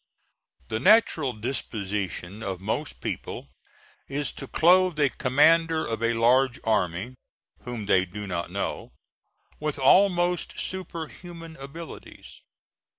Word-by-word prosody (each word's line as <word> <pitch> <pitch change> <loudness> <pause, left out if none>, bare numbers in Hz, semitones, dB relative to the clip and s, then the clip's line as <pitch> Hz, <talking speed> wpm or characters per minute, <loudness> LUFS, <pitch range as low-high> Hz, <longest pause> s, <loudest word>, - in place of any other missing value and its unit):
The 110 0 -1
natural 165 - +4
disposition 105 -4 -4
of 95 -4 -4
most 110 +10 -3
people - - -5 0.6
is 140 -1 -2
to 135 - -9
clothe 180 +1 +4
a 145 -3 +3
commander 160 +5 +3
of 115 -1 -3
a 115 0 +1
large 125 +2 +3
army 100 +1 0 0.5
whom 120 -4 -5
they 95 -1 +3
do 105 +4 -7
not 85 -3 -3
know, - - -4 0.7
with 150 -1 -2
almost 180 +4 +3
superhuman 170 -2 -6
abilities. 140 +5 -10
135 Hz, 110 wpm, -26 LUFS, 110-165 Hz, 0.7 s, natural